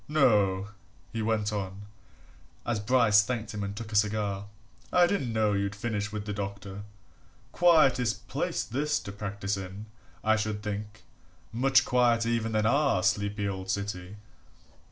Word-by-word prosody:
No," 105 Hz, -10 st, +3 dB, 0.4 s
he 115 Hz, -, -2 dB
went 110 Hz, -1 st, 0 dB
on, 100 Hz, 0 st, -4 dB, 0.8 s
as 120 Hz, -3 st, 0 dB
Bryce 110 Hz, -1 st, +5 dB
thanked 110 Hz, 0 st, -4 dB
him 105 Hz, -1 st, -3 dB
and 100 Hz, 0 st, -4 dB
took 110 Hz, 0 st, -7 dB
a -, -, -5 dB
cigar, 105 Hz, -1 st, 0 dB, 0.4 s
"I 180 Hz, -1 st, +6 dB
didn't 175 Hz, -10 st, -1 dB
know 110 Hz, -2 st, +2 dB
you'd 100 Hz, 0 st, -1 dB
finished 105 Hz, -1 st, -3 dB
with 105 Hz, -1 st, -5 dB
the 105 Hz, -, -3 dB
doctor. 100 Hz, 0 st, -5 dB, 0.7 s
Quietish 145 Hz, -9 st, +3 dB
place -, -, -1 dB
this 150 Hz, +5 st, -1 dB
to 100 Hz, -, -8 dB
practise 100 Hz, 0 st, -3 dB
in, 95 Hz, +2 st, -7 dB, 0.4 s
I 110 Hz, 0 st, +3 dB
should 110 Hz, -1 st, -3 dB
think 105 Hz, +1 st, -5 dB, 0.5 s
much 130 Hz, +2 st, +4 dB
quieter 120 Hz, -2 st, +3 dB
even 115 Hz, -1 st, 0 dB
than 110 Hz, 0 st, +1 dB
our 135 Hz, -5 st, +2 dB
sleepy 100 Hz, 0 st, 0 dB
old 95 Hz, -1 st, -5 dB
city." 95 Hz, -1 st, -3 dB
105 Hz, 150 wpm, -28 LUFS, 100-115 Hz, 0.8 s, I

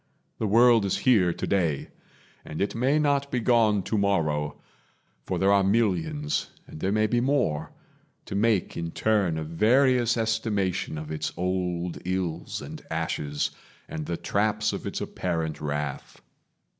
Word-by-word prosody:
The 110 Hz, -, 0 dB
world 115 Hz, +1 st, +5 dB
is 100 Hz, -, 0 dB
here 105 Hz, -9 st, +5 dB
Today, 85 Hz, -5 st, -1 dB, 0.5 s
and 75 Hz, -, -7 dB
it 100 Hz, -, 0 dB
may 130 Hz, +6 st, +2 dB
not 140 Hz, -2 st, +1 dB
be 125 Hz, -, 0 dB
gone 110 Hz, -4 st, +3 dB
tomorrow; 80 Hz, -9 st, 0 dB, 0.7 s
For -, -, -1 dB
there 100 Hz, +1 st, +3 dB
are 100 Hz, -1 st, +4 dB
millions, 120 Hz, -, 0 dB, 0.2 s
and -, -, -11 dB
there 95 Hz, +4 st, 0 dB
may 110 Hz, +1 st, +2 dB
be 120 Hz, +2 st, +1 dB
more, 120 Hz, -, 0 dB, 0.5 s
To -, -, -7 dB
make 105 Hz, -1 st, +1 dB
in 85 Hz, 0 st, -3 dB
turn 100 Hz, -7 st, +1 dB
a 80 Hz, -, -2 dB
various 120 Hz, -, +3 dB
estimation 110 Hz, -7 st, -1 dB
Of 75 Hz, 0 st, -6 dB
its 75 Hz, 0 st, -2 dB
old 90 Hz, -1 st, -2 dB
ills 90 Hz, -3 st, -3 dB
and -, -, -8 dB
ashes, 75 Hz, -1 st, -2 dB, 0.4 s
and 80 Hz, -2 st, -5 dB
the 85 Hz, -, -2 dB
traps 110 Hz, +1 st, 0 dB
Of -, -, -5 dB
its -, -, -4 dB
apparent 80 Hz, -4 st, -3 dB
wrath. 75 Hz, -2 st, -4 dB
100 Hz, 145 wpm, -26 LUFS, 85-115 Hz, 0.7 s, world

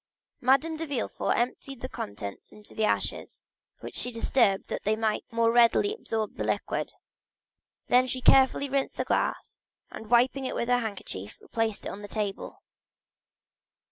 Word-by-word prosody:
Madame 275 Hz, +6 st, +3 dB
de 325 Hz, 0 st, -4 dB
Villefort 270 Hz, -6 st, -1 dB
emptied 255 Hz, +2 st, -2 dB
the 255 Hz, -, -3 dB
contents 100 Hz, -, -7 dB
into 210 Hz, -1 st, -14 dB
the 220 Hz, -, -1 dB
ashes, -, -, -2 dB, 0.4 s
which -, -, -8 dB
she 250 Hz, -, +1 dB
disturbed 230 Hz, -4 st, +2 dB
that -, -, -4 dB
they 215 Hz, +1 st, +1 dB
might 220 Hz, -1 st, 0 dB
the 230 Hz, -, -15 dB
more 230 Hz, 0 st, +4 dB
readily 240 Hz, -, +4 dB
absorb 225 Hz, -, -3 dB
the -, -, -2 dB
liquid; -, -, -2 dB, 0.9 s
then 250 Hz, +1 st, +4 dB
she 255 Hz, -, -2 dB
carefully 265 Hz, +2 st, +5 dB
rinsed 275 Hz, 0 st, -1 dB
the -, -, 0 dB
glass, -, -, -1 dB, 0.3 s
and 220 Hz, -, -9 dB
wiping 255 Hz, +3 st, +3 dB
it -, -, -3 dB
with 235 Hz, -, -2 dB
her 245 Hz, 0 st, +4 dB
handkerchief 195 Hz, -, -6 dB
replaced 225 Hz, -2 st, -2 dB
it -, -, -2 dB
on 200 Hz, -, -7 dB
the 205 Hz, -, -7 dB
table. 205 Hz, -1 st, -4 dB
235 Hz, 165 wpm, -28 LUFS, 215-260 Hz, 0.9 s, carefully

